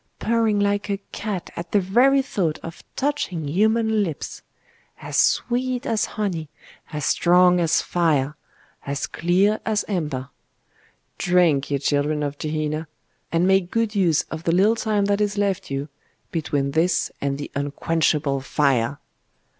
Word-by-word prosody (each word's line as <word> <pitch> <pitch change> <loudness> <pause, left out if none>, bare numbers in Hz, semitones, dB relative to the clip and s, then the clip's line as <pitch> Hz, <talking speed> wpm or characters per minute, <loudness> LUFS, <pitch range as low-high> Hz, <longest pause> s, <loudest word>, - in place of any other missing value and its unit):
purring 225 -2 +1
like 205 0 0
a 200 - 0
cat 200 -4 -4
at 170 0 -6
the 205 - +5
very 250 +9 +4
thought 170 - -1
of 165 0 -9
touching 260 - -2
human 220 +6 +2
lips! 165 -7 -4 0.6
As - - -6
sweet 250 +1 +1
as 220 -2 +1
honey, 175 -8 -2 0.4
as 150 -2 -3
strong 180 0 +4
as 165 -1 +2
fire, 150 -5 +1 0.5
as 140 0 -2
clear 190 +5 +1
as 215 -2 0
amber! 150 -10 -3 0.9
Drink, 170 -6 +3
ye 140 - +1
children 145 +2 0
of 145 0 -4
Gehenna; 155 0 -2 0.4
and 170 +1 +2
make 190 -1 +3
good 230 0 0
use 180 -7 +2
of 160 0 -5
the 165 - +2
little 200 +6 +4
time 215 -3 0
that 200 +1 +1
is 205 0 0
left 200 -2 -1
you 140 +1 -3 0.4
between 145 -4 -1
this 165 +5 +1
and 140 -1 -1
the 145 - -7
unquenchable 145 0 0
fire! 135 -2 +1
175 Hz, 145 wpm, -23 LUFS, 150-205 Hz, 0.9 s, the